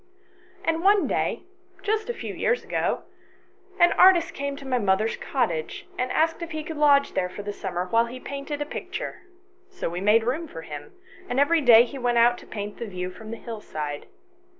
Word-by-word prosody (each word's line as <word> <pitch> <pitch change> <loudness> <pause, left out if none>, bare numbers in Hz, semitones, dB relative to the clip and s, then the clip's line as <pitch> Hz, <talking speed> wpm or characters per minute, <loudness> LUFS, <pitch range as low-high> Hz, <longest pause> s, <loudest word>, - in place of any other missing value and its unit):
And 325 0 +1
one 405 0 +5
day, - - -1 0.4
just 435 +2 -1
a - - 0
few - - -6
years 475 - 0
ago, - - -1 0.8
an 345 0 +6
artist 360 -3 +5
came 280 0 -3
to 280 - -10
my 255 -1 +1
mother's 205 +1 +1
cottage, 175 - -2
and 255 0 -2
asked 325 +2 +1
if 335 - -4
he 310 -2 -4
could 315 0 -6
lodge 285 -1 +4
there 180 - 0
for 205 +3 -8
the 205 0 -4
summer 180 -3 -3
while 230 +5 +2
he 250 +2 -8
painted 280 +2 -4
a - - -10
picture; - - -6 0.5
so 375 - -4
we 175 +1 -4
made 215 +3 +4
room 290 +8 -1
for 165 - -9
him, 150 - -9 0.4
and 245 - 0
every 320 +3 +4
day 235 -4 +8
he 270 +2 -8
went 240 -1 +1
out 240 +1 +5
to - - -15
paint 205 -1 -6
the 235 - -4
view 180 -2 -4
from 215 +4 -11
the 230 - -5
hillside. 155 -12 -6
245 Hz, 200 wpm, -25 LUFS, 205-310 Hz, 0.8 s, day